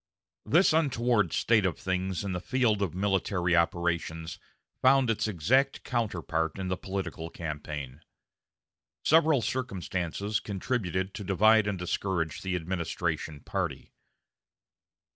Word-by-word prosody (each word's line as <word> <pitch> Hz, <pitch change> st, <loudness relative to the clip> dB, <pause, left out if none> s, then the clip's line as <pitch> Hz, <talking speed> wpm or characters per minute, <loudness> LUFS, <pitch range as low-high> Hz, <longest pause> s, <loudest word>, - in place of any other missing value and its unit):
This 170 Hz, +1 st, +5 dB
untoward 120 Hz, -, +2 dB
state 110 Hz, -3 st, +3 dB
of 90 Hz, -5 st, 0 dB
things 95 Hz, 0 st, -2 dB
in 100 Hz, -, -3 dB
the 90 Hz, -, -2 dB
field 115 Hz, -3 st, +1 dB
of 90 Hz, -4 st, -1 dB
military 95 Hz, -2 st, +1 dB
operations 85 Hz, -1 st, -1 dB, 0.4 s
found 130 Hz, -2 st, +5 dB
its 110 Hz, -, -1 dB
exact 120 Hz, -, +1 dB
counterpart 90 Hz, -9 st, -1 dB
in 95 Hz, -1 st, -3 dB
the 95 Hz, -, 0 dB
political 95 Hz, -3 st, -5 dB
campaign. 75 Hz, -4 st, -6 dB, 1.0 s
Several 155 Hz, -5 st, +4 dB
circumstances 100 Hz, -, -2 dB
contributed 95 Hz, -3 st, -2 dB
to 105 Hz, -, -6 dB
divide 110 Hz, +3 st, +4 dB
and 100 Hz, -2 st, -1 dB
discourage 90 Hz, -3 st, -2 dB
the 95 Hz, -1 st, -2 dB
administration 80 Hz, -3 st, -3 dB
party. -, -, -4 dB
95 Hz, 115 wpm, -29 LUFS, 85-110 Hz, 1.0 s, This